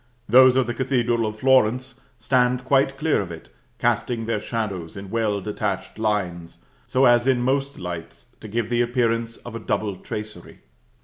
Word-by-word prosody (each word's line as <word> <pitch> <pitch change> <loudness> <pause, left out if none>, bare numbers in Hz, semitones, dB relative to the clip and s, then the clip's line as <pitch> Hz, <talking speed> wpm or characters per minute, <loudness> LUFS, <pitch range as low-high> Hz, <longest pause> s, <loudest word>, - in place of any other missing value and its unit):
Those 130 +3 +7
of 130 -1 +3
the 120 - -3
Cathedral 120 -3 0
of 105 0 -5
Florence 130 +1 +2 0.2
stand 125 +1 +1
quite 135 0 +2
clear 155 -3 +1
of 90 -3 -6
it, 80 -7 -10 0.3
casting 115 -2 0
their 115 -2 -1
shadows 100 -7 -4
in 95 0 -8
well 110 -3 0
detached 105 0 -4
lines, 95 -6 -2 0.3
so 130 +1 +3
as 120 0 +4
in 125 -2 +2
most 135 +2 0
lights 85 -8 -7
to 110 - -9
give 115 +2 -2
the 120 0 +2
appearance 115 -1 0
of 120 - -10
a 115 - -5
double 105 -2 -2
tracery. 105 -5 -8
115 Hz, 170 wpm, -23 LUFS, 105-125 Hz, 0.3 s, Those